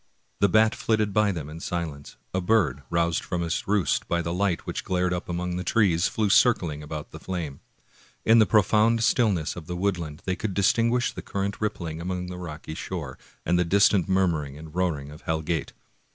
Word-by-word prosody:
The 100 Hz, -, +4 dB
bat 110 Hz, +3 st, +4 dB
flitted 110 Hz, -2 st, 0 dB
by 105 Hz, -1 st, +3 dB
them 80 Hz, -6 st, -5 dB
in 80 Hz, +2 st, -8 dB
silence; 80 Hz, -5 st, -5 dB, 0.2 s
a 95 Hz, -, 0 dB
bird, 90 Hz, -, +2 dB
roused 85 Hz, 0 st, +1 dB
from 90 Hz, -2 st, -2 dB
its 85 Hz, -1 st, -2 dB
roost 100 Hz, -2 st, +1 dB
by 85 Hz, 0 st, 0 dB
the 85 Hz, +1 st, -2 dB
light 95 Hz, -1 st, 0 dB
which -, -, -4 dB
glared 90 Hz, -1 st, 0 dB
up 90 Hz, 0 st, -4 dB
among 90 Hz, 0 st, -2 dB
the 90 Hz, -, -3 dB
trees, 95 Hz, -3 st, +3 dB
flew 110 Hz, -1 st, 0 dB
circling 90 Hz, -8 st, +3 dB
about 75 Hz, 0 st, -7 dB
the -, -, -9 dB
flame. 85 Hz, -7 st, -5 dB, 0.7 s
In 115 Hz, +1 st, +6 dB
the 110 Hz, -, +5 dB
profound 110 Hz, +2 st, +3 dB
stillness 105 Hz, -, +2 dB
of 85 Hz, -3 st, -9 dB
the 90 Hz, -, -4 dB
woodland 85 Hz, -5 st, -2 dB
they 95 Hz, -, 0 dB
could 100 Hz, -2 st, -4 dB
distinguish 115 Hz, +5 st, +2 dB
the -, -, -7 dB
current 100 Hz, +1 st, -3 dB
rippling 85 Hz, -7 st, -3 dB
along 90 Hz, 0 st, -3 dB
the 90 Hz, -, -7 dB
rocky 80 Hz, -3 st, -7 dB
shore, 80 Hz, -5 st, -6 dB, 0.3 s
and 90 Hz, +1 st, +2 dB
the -, -, +4 dB
distant 100 Hz, 0 st, +3 dB
murmuring 80 Hz, -7 st, +1 dB
and 80 Hz, 0 st, -11 dB
roaring 80 Hz, -6 st, -1 dB
of 75 Hz, -, -12 dB
Hell 80 Hz, -2 st, -2 dB
Gate. 80 Hz, -1 st, -2 dB
90 Hz, 195 wpm, -26 LUFS, 80-100 Hz, 0.7 s, In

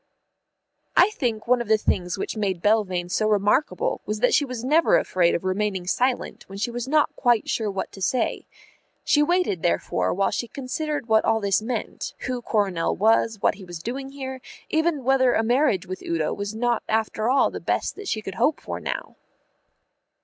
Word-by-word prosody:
I 380 Hz, +4 st, +6 dB
think 240 Hz, -, -2 dB
one 250 Hz, 0 st, +3 dB
of 235 Hz, -, -5 dB
the 220 Hz, 0 st, +4 dB
things 180 Hz, -3 st, -1 dB
which -, -, -4 dB
made 195 Hz, -4 st, -1 dB
Belvane 200 Hz, -5 st, +2 dB
so 215 Hz, +4 st, +1 dB
remarkable 210 Hz, +7 st, +1 dB
was 210 Hz, 0 st, -2 dB
that 250 Hz, -, +3 dB
she -, -, +4 dB
was 255 Hz, -4 st, -5 dB
never 310 Hz, +6 st, +4 dB
afraid 175 Hz, -2 st, +2 dB
of 170 Hz, -, -3 dB
remaining 190 Hz, -1 st, -1 dB
silent 245 Hz, +7 st, -1 dB
when 195 Hz, -, -8 dB
she 220 Hz, +4 st, -2 dB
was 240 Hz, +1 st, -4 dB
not 300 Hz, +1 st, +2 dB
quite 240 Hz, -4 st, +2 dB
sure 220 Hz, -2 st, -1 dB
what 195 Hz, -1 st, -4 dB
to 195 Hz, -, -12 dB
say. 235 Hz, +5 st, -1 dB, 0.6 s
She 295 Hz, -, +3 dB
waited 345 Hz, -, +1 dB
therefore 90 Hz, -, 0 dB
while 195 Hz, +1 st, +1 dB
she 240 Hz, -, -2 dB
considered 285 Hz, +3 st, -4 dB
what 220 Hz, -1 st, +4 dB
all 225 Hz, -, +2 dB
this 200 Hz, -1 st, +1 dB
meant; 245 Hz, +3 st, -4 dB
who 255 Hz, -2 st, -3 dB
Coronel 200 Hz, -7 st, 0 dB
was, 225 Hz, +2 st, +3 dB
what -, -, +4 dB
he 195 Hz, -, -12 dB
was 175 Hz, -2 st, -7 dB
doing 260 Hz, +10 st, -5 dB
there, 265 Hz, -2 st, -7 dB, 0.3 s
even 315 Hz, -3 st, +1 dB
whether 260 Hz, -1 st, +3 dB
a 225 Hz, -, +2 dB
marriage 240 Hz, -5 st, +2 dB
with 185 Hz, 0 st, -6 dB
Udo 165 Hz, -2 st, -1 dB
was 205 Hz, +1 st, -5 dB
not 240 Hz, 0 st, 0 dB
after 220 Hz, +1 st, 0 dB
all 270 Hz, +1 st, +3 dB
the -, -, -5 dB
best -, -, -1 dB
that 410 Hz, -1 st, -9 dB
she 215 Hz, -9 st, -2 dB
could 195 Hz, -, -5 dB
hope 300 Hz, -, +3 dB
for -, -, -6 dB
now. -, -, -5 dB
225 Hz, 195 wpm, -24 LUFS, 195-260 Hz, 0.6 s, I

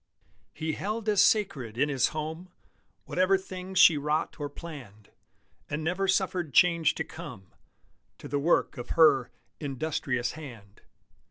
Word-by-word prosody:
He 160 Hz, 0 st, -3 dB
held 215 Hz, +5 st, -4 dB
as 205 Hz, -1 st, +5 dB
sacred 135 Hz, -, +1 dB
in 145 Hz, +3 st, +2 dB
his 135 Hz, -4 st, +2 dB
home 160 Hz, +4 st, -5 dB, 0.6 s
Whatever 185 Hz, +1 st, +2 dB
things 190 Hz, 0 st, -7 dB
she 165 Hz, -5 st, +7 dB
wrought 150 Hz, +3 st, -1 dB
or 145 Hz, -1 st, -3 dB
planned, 135 Hz, -, -11 dB, 0.6 s
And 150 Hz, +1 st, -3 dB
never 180 Hz, +4 st, -1 dB
suffered 185 Hz, -5 st, 0 dB
change 170 Hz, -4 st, +4 dB
to 160 Hz, -, -2 dB
come 125 Hz, -, -10 dB, 0.7 s
To -, -, -10 dB
the 145 Hz, -, -1 dB
work 150 Hz, -2 st, +1 dB
of 120 Hz, -, -7 dB
her 155 Hz, -6 st, +5 dB, 0.3 s
"industrious 135 Hz, -3 st, -2 dB
hand." 115 Hz, -10 st, -11 dB
155 Hz, 140 wpm, -28 LUFS, 135-180 Hz, 0.7 s, she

